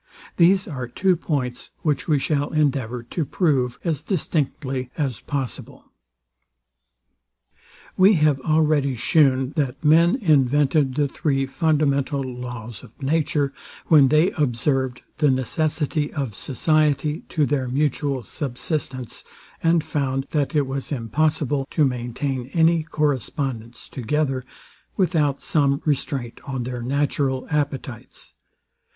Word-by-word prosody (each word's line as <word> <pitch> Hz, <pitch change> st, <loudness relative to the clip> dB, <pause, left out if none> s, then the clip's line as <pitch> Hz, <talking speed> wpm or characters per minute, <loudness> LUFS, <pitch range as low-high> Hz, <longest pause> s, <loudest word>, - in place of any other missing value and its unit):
These 185 Hz, +3 st, +4 dB
are 130 Hz, -7 st, -5 dB
two 185 Hz, +10 st, +2 dB
points, 130 Hz, -7 st, -3 dB
which 150 Hz, -3 st, 0 dB
we 155 Hz, -3 st, +3 dB
shall 145 Hz, +1 st, 0 dB
endeavour 130 Hz, -6 st, 0 dB
to 155 Hz, +7 st, -3 dB
prove 135 Hz, -5 st, 0 dB
as 160 Hz, -5 st, -1 dB
distinctly 145 Hz, -6 st, -2 dB
as 135 Hz, -8 st, -1 dB
possible. 135 Hz, -4 st, -6 dB, 2.0 s
We 190 Hz, +3 st, +6 dB
have 150 Hz, -5 st, +3 dB
already 150 Hz, -3 st, +2 dB
shewn, 130 Hz, +1 st, +3 dB
that 135 Hz, -1 st, -1 dB
men 165 Hz, +5 st, +5 dB
invented 145 Hz, -, +2 dB
the 145 Hz, -1 st, +2 dB
three 135 Hz, -1 st, -1 dB
fundamental 140 Hz, -2 st, +1 dB
laws 125 Hz, -4 st, -7 dB
of 115 Hz, -3 st, -16 dB
nature, 145 Hz, 0 st, 0 dB, 0.4 s
when 150 Hz, -4 st, +7 dB
they 155 Hz, +7 st, +3 dB
observed 130 Hz, -2 st, 0 dB, 0.2 s
the 150 Hz, -2 st, +4 dB
necessity 150 Hz, +3 st, 0 dB
of 135 Hz, -7 st, -3 dB
society 150 Hz, -, +1 dB
to 155 Hz, -4 st, +1 dB
their 135 Hz, -2 st, -1 dB
mutual 140 Hz, 0 st, 0 dB
subsistance, 130 Hz, -2 st, -4 dB, 0.4 s
and 165 Hz, -1 st, +3 dB
found, 135 Hz, -4 st, -1 dB
that 150 Hz, +1 st, 0 dB
it 145 Hz, -2 st, +3 dB
was 135 Hz, +2 st, -5 dB
impossible 145 Hz, +2 st, 0 dB
to 155 Hz, -, +2 dB
maintain 125 Hz, +1 st, -3 dB
any 165 Hz, 0 st, +4 dB
correspondence 135 Hz, -, -2 dB
together, 135 Hz, +1 st, -1 dB, 0.5 s
without 155 Hz, -7 st, +1 dB
some 140 Hz, -2 st, +2 dB
restraint 135 Hz, -5 st, -2 dB
on 130 Hz, -3 st, -4 dB
their 125 Hz, 0 st, -5 dB
natural 135 Hz, 0 st, 0 dB
appetites. 140 Hz, -5 st, -4 dB
140 Hz, 115 wpm, -23 LUFS, 130-155 Hz, 2.0 s, when